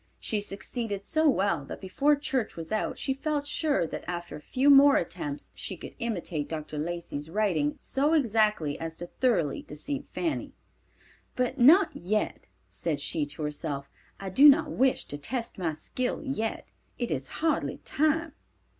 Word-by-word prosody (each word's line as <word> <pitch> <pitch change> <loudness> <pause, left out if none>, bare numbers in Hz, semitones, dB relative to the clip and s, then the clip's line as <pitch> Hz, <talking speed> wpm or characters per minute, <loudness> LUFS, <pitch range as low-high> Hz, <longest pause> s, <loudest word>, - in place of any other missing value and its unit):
She 210 -2 -1
succeeded 205 0 -4
so 315 +3 +3
well 190 - +1
that - - -7
before 280 +10 +2
church 270 -5 -2
was 165 -1 -6
out 215 - -1
she 270 - -1
felt 290 +1 -2
sure 290 - +1
that - - -6
after 175 -1 -4
a - - -9
few 265 - +3
more 280 0 +8
attempts 145 -3 -3
she - - -5
could - - -9
imitate 175 -10 -2
Dr. 155 -1 -5
Lacey's 165 -2 -4
writing 165 -7 +1
so 290 +4 +1
exactly 215 - +2
as 165 0 -5
to 175 - -5
thoroughly 175 - 0
deceive 270 - -5
Fanny. 330 -3 -2 0.8
"But 250 +2 -1
not 325 +11 +6
yet," 210 +5 -2 0.2
said 155 -4 -2
she 145 +1 0
to 145 +2 -5
herself; 145 -2 -4 0.3
"I 195 -1 -5
do 280 +10 +9
not 280 - +4
wish 265 0 +2
to 145 - -6
test 230 - -3
my 170 -3 0
skill 245 - -3
yet. 225 -6 -3 0.3
It 240 - -2
is 135 -3 -2 0.2
hardly 325 - +1
time." 315 +2 +1
210 Hz, 165 wpm, -28 LUFS, -, 0.8 s, do